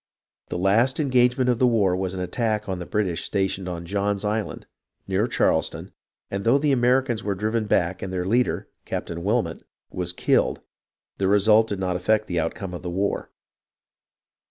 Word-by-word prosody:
The - - -3
last 110 - +2
engagement 125 -2 +3
of 120 -2 +2
the 125 - +5
war 100 -6 +3
was 95 0 -2
an 90 - -3
attack 105 +2 -1
on 95 -2 -3
the 90 - -6
British 95 -6 -1
stationed 95 -2 -1
on 85 -1 -5
John's 100 +2 -1
Island, 105 +1 -2 0.4
near 95 +4 +1
Charleston, - - 0 0.4
and 100 0 -2
though 115 +6 +4
the 145 0 +1
Americans 125 -2 +2
were 100 -1 -1
driven 110 +3 -1
back 90 -2 +1
and 95 - -4
their 90 -1 -2
leader. 120 +6 +1 0.2
Captain 85 0 -5
Wilmot, 110 +4 0 0.3
was 90 -1 -2
killed, 90 - +1 0.6
the 95 - +1
result 105 +3 +5
did 100 - -3
not 90 -1 -1
affect 110 +4 +1
the 90 -3 -1
outcome 90 +3 -3
of 90 - -6
the 90 - -5
war. 95 +3 -1
100 Hz, 175 wpm, -24 LUFS, 90-115 Hz, 0.6 s, the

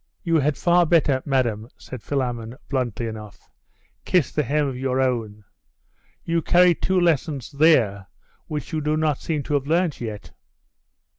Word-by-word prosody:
'You 165 -2 +2
had 145 -1 +1
far 175 -1 +3
better, 150 -5 +3
madam,' 120 -5 0
said 130 - -9
Philammon, 120 -4 -3
bluntly 125 -4 -2
enough, 110 -2 -9 0.6
'kiss 175 -8 +1
the 150 - 0
hem 150 +2 0
of 135 - -4
your 130 0 -1
own. 115 -5 -1 0.8
You 165 0 0
carry 180 +2 +5
two 185 +3 0
lessons 155 -6 0
there 125 - +3 0.4
which 150 -2 -5
you 155 - -1
do 150 +1 0
not 155 -3 0
seem 155 -3 -2
to 150 - -4
have 140 -1 0
learnt 165 -2 0
yet. 110 -3 -6
140 Hz, 155 wpm, -23 LUFS, 120-160 Hz, 0.8 s, carry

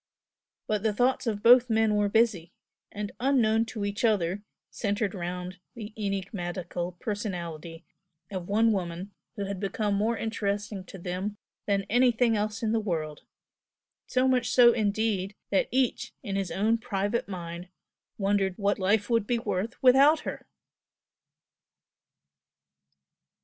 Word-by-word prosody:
But 210 -2 -1
the 215 0 +1
thoughts 250 +2 +1
of 205 -2 -2
both 245 +1 +7
men 220 -1 +3
were 205 -1 +2
busy; 200 -6 +1 0.4
and 205 0 -5
unknown 230 -4 +3
to 220 -3 -4
each 205 +2 -3
other, 200 -4 +1 0.3
centered 205 -2 -1
round 180 0 -5 0.2
the 215 -2 -8
enigmatical 185 -3 -4
personality 175 -6 -5 0.5
of 185 -3 -5
one 225 +3 +3
woman 185 -1 -3 0.2
who 200 -2 -3
had 195 -1 -4
become 205 +1 -1
more 220 +3 +1
interesting 205 -2 -3
to 195 - -10
them 185 +4 -4 0.3
than 200 -1 +1
anything 240 0 +3
else 210 +1 -2
in 220 - +1
the 225 - +2
world, 160 -7 -3 0.9
so 255 0 +2
much 250 -2 +2
so 240 -2 +7
indeed 210 -2 0 0.2
that 195 - +2
each 255 0 0
in 195 - -3
his 195 -2 -1
own 220 +4 +1
private 205 -1 -2
mind 175 -2 -6 0.5
wondered 195 -2 +1
what 200 -1 0
life 205 +2 +2
would 230 -3 +1
be 240 - +1
worth 225 -1 -2
without 275 +5 +6
her! - - -6
205 Hz, 135 wpm, -28 LUFS, 190-225 Hz, 0.9 s, both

